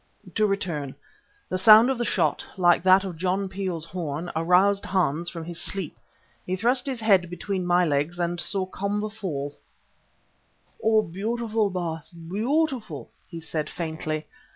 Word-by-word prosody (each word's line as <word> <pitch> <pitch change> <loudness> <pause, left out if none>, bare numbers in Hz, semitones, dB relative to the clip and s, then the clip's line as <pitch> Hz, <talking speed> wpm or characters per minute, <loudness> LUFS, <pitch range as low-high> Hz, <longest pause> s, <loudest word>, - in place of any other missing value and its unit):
To 215 -1 +2
return: 170 -9 -2 0.5
the 185 - -1
sound 220 +5 +8
of 260 - -2
the 240 - 0
shot, 160 -8 +1
like 175 -2 +4
that 190 +2 +5
of 185 -4 -6
John 190 +3 0
Peel's 185 -4 -4
horn, 165 -1 -4
aroused 180 +5 +3
Hans 170 -3 0
from 165 -2 -7
his 170 0 -4
sleep. 195 -5 -2 0.5
He 185 - -2
thrust 245 +6 +1
his 255 -4 -3
head 195 -5 +4
between 185 +1 -3
my 175 0 +4
legs 150 +3 0
and 175 0 -1
saw 190 +1 0
Komba 205 +3 -2
fall. 145 -10 -5 1.2
"Oh! 220 -1 +4
beautiful, 215 +4 -1
Baas, 170 -3 -4
beautiful!" 215 - -2 0.2
he 170 - -7
said 160 -1 -3
faintly. 160 -2 -4
185 Hz, 150 wpm, -25 LUFS, 165-205 Hz, 1.2 s, sound